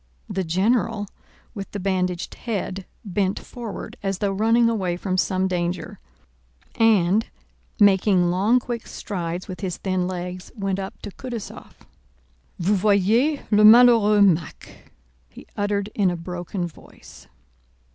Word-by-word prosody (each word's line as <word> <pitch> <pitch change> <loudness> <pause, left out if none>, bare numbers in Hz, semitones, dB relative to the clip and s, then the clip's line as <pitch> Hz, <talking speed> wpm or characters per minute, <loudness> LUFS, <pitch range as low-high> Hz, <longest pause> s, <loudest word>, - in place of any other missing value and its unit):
The 190 - -2
general 205 +5 +1 0.5
with 200 -4 -7
the 205 - -3
bandaged 185 -2 -1
head 195 -4 -4 0.2
bent 195 0 -1
forward 235 -4 -8
as 195 -1 -2
though 200 0 -1
running 225 +4 +3
away 190 -6 -1
from 185 0 -2
some 185 0 +1
danger, 175 -1 -3 0.7
and, 215 -1 +3 0.5
making 190 -3 +4
long, 205 +7 +3
quick 240 -2 -6
strides 175 -2 -5
with 185 -3 -7
his 180 -2 -4
thin 185 -2 -1
legs, 180 0 -6
went 195 -3 -2
up 190 0 -6
to - - -6
Kutúzov. 240 -1 -9 0.7
"Vous 185 +4 +1
voyez 215 +9 +2
le 210 0 +5
malheureux 220 -2 +7
Mack," 170 -4 -2 0.4
he - - -14
uttered 205 0 -1
in 200 -3 +2
a 175 - -3
broken 180 +2 -5
voice. 170 - -14
195 Hz, 130 wpm, -23 LUFS, 180-215 Hz, 0.7 s, malheureux